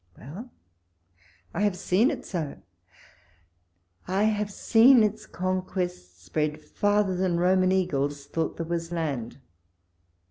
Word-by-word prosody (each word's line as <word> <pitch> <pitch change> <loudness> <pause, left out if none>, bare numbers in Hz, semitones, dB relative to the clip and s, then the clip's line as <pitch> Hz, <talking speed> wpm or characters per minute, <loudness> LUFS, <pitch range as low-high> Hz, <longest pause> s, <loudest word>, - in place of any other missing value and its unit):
Well 180 - -9 1.0
I - - -3
I - - 0
have 205 -3 +1
seen 205 +10 +2
it 290 - -5
so; 165 -6 -4 1.5
I 190 +3 +1
have 210 -1 +1
seen 230 +4 +5
its 215 +1 -2
conquests 180 - -3
spread 150 - -2
farther 205 +3 0
than 180 -1 0
Roman 185 +1 +3
eagles 145 -6 0
thought 160 +2 -3
there 165 - -3
was 165 0 -3
land. 145 -9 -3
180 Hz, 120 wpm, -26 LUFS, 155-205 Hz, 1.5 s, seen